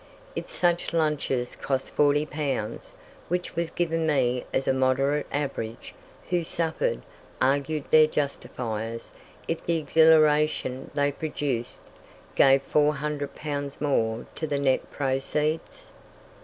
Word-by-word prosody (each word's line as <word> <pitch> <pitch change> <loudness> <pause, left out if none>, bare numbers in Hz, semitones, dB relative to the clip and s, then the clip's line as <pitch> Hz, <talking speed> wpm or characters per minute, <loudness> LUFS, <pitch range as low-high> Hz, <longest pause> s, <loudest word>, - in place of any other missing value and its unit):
If - - -5
such 175 -1 0
lunches 150 -6 0
cost 135 -1 -2
40 145 +1 +3
pounds, 150 - -4 0.3
which 180 0 -2
was 170 0 -1
given 165 -2 -1
me 125 -4 +1
as 135 - -1
a - - +4
moderate 135 +3 +1
average, 135 -6 -4 0.4
who 175 -1 +2
suffered, 160 0 -1 0.4
argued 140 +3 +1
their 155 0 +7
justifiers, 115 -6 -3 0.4
if 165 - -2
the 170 -1 +1
exhilaration 155 -3 +3
they 145 0 +2
produced 140 -5 -3 0.5
gave 135 0 +5
400 150 0 0
pounds 145 -2 -4
more 115 -6 0
to 160 - -4
the 145 - -1
net 135 -2 +1
proceeds? 150 - -2
145 Hz, 115 wpm, -26 LUFS, 135-155 Hz, 0.5 s, their